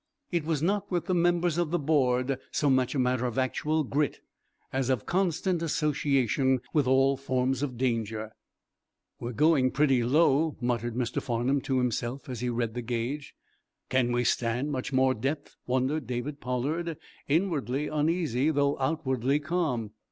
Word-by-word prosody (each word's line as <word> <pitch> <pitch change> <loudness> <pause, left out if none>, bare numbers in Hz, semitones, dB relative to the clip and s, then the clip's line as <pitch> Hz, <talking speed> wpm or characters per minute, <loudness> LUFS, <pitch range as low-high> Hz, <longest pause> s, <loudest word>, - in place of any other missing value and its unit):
It 170 -4 0
was 155 -2 -1
not, 200 +3 0
with 175 -3 -1
the 185 - 0
members 175 -1 +2
of 170 -3 +1
the 175 - +1
board, 135 -4 +1
so 145 -2 +1
much 130 +1 +2
a - - 0
matter 125 -1 +1
of 120 - -5
actual 150 +4 0
grit 145 +2 -1 0.5
as 130 -1 0
of 130 -5 0
constant 180 -1 0
association 140 -4 +1
with 145 -4 +2
all 135 +1 +4
forms 130 -1 0
of 130 -4 -3
danger. 110 -3 -1 0.9
"We're 120 +1 -4
going 145 -1 +4
pretty 135 -3 +2
low," 150 +3 +3
muttered 120 -2 -1
Mr. 125 -1 -1
Farnum 125 +2 0
to 130 0 -1
himself, 125 +1 -2
as 125 -3 -4
he 125 +1 -1
read 115 -2 -1
the 125 - -3
gauge. 120 +5 -3 0.5
"Can 130 -2 +2
we 120 0 +1
stand 120 +5 0
much 130 0 -3
more 130 0 +3
depth?" 140 +5 -3
wondered 130 +3 0
David 130 +4 -4
Pollard, 150 +7 -2 0.3
inwardly 150 -4 0
uneasy, 155 -3 +1
though 140 -2 +1
outwardly 135 -2 0
calm. 145 - -1
135 Hz, 160 wpm, -28 LUFS, 125-150 Hz, 0.9 s, all